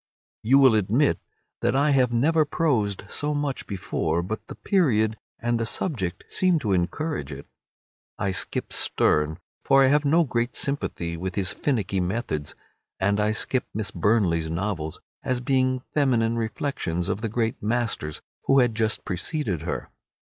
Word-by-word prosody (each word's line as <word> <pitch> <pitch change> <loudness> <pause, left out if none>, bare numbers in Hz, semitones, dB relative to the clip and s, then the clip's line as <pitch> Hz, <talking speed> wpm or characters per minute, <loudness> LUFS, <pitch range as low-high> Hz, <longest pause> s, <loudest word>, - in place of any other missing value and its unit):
You 130 +5 +4
will 135 -4 +7
admit 110 +7 +2 0.4
that - - +1
I 145 +2 +3
have 130 -3 +3
never 155 +7 +3
prosed 135 - 0
so 150 0 -2
much 145 -2 -2
before, 85 -4 -1
but 110 +5 -5
the - - -8
period 110 - +2 0.2
and 120 0 0
the 115 - 0
subject 105 - -2
seem 185 -2 +2
to 105 -6 0
encourage 95 - -1
it. 70 0 -8 0.7
I 100 - -1
skip 95 - -1
Sterne, 75 +1 +1 0.3
for 135 0 +5
I 130 - +5
have 145 +1 +3
no 160 +4 +4
great 120 -3 -1
sympathy 85 -12 -1
with 95 +2 -4
his 95 -2 0
finicky 105 -9 -1
methods. 90 - -2 0.4
And 100 +2 +2
I 105 +1 +2
skip 125 +3 0
Miss 105 -2 -1
Burney's 90 -7 +1
novels, 80 -2 -3 0.2
as 130 -1 -1
being 130 0 +1
feminine 120 -6 +2
reflections 110 - -2
of 100 - -2
the 115 - -2
great 115 0 -1
masters 110 -9 -2 0.2
who 135 - +4
had 125 -3 +4
just 110 0 0
preceded 95 - -2
her. 85 - -4
115 Hz, 155 wpm, -25 LUFS, 95-135 Hz, 0.7 s, will